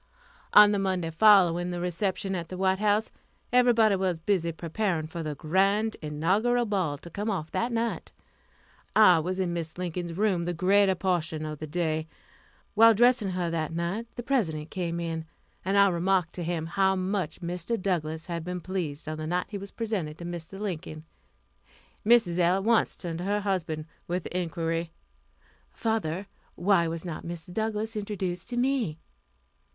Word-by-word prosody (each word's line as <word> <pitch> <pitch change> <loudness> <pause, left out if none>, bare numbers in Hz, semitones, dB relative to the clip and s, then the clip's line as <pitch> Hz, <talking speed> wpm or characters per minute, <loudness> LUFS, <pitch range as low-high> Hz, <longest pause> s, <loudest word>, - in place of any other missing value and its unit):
On 210 0 +9
the 205 - +1
Monday 185 -4 -1
following 175 -2 +5
the 175 -1 -3
reception 190 +2 -1
at 170 -3 -3
the 185 - -7
White 190 0 +1
House, 210 +1 +1 0.4
everybody 235 -4 +5
was 185 -3 -1
busy 170 -1 0
preparing 170 0 -2
for 165 +2 -6
the 155 -2 -4
grand 195 +8 +1
inaugural 195 +11 +1
ball 185 -9 -1
to 170 - -12
come 205 +5 -3
off 170 -7 -3
that 240 +2 -1
night. 230 0 -2 0.8
I 185 -6 +7
was 185 +4 -2
in 180 -2 0
Mrs. 165 -1 -4
Lincoln's 175 -1 -4
room 190 -2 +1
the 175 0 -2
greater 190 +2 +4
portion 170 -4 -1
of 155 -1 -5
the 155 - -5
day. 160 -1 -1 0.7
While 225 +1 +7
dressing 240 -2 +4
her 180 -2 -2
that 160 -1 -2
night, 175 +7 -2
the 240 - -5
President 165 - -1
came 170 -2 -2
in, 165 -1 -3 0.4
and 195 +2 +1
I 200 0 +7
remarked 180 0 +1
to 175 - -4
him 165 -1 -2
how 190 +3 +2
much 185 -4 -2
Mr. 175 +6 -3
Douglass 160 -4 -2
had 170 -2 -4
been 180 +1 -4
pleased 170 -5 -4
on 155 0 -4
the 155 - -4
night 180 +2 0
he 200 -1 -5
was 200 +1 -8
presented 195 -10 -3
to 170 - -8
Mr. 175 +2 -7
Lincoln. 160 -6 -5 1.0
Mrs. 210 -6 +4
L. 175 +1 +4
at 195 - -1
once 230 +1 +2
turned 170 -2 -5
to 180 - -4
her 205 +1 0
husband 165 -6 -2 0.2
with 175 0 -2
the - - -8
inquiry, 165 -1 -2 0.8
"Father, 205 -6 -1 0.3
why 175 -2 +3
was 165 +1 -4
not 170 -3 -5
Mr. 170 +1 -7
Douglass 220 +1 -2
introduced 195 -3 -4
to 240 - -3
me?" 245 - 0
180 Hz, 175 wpm, -27 LUFS, 165-205 Hz, 1.0 s, On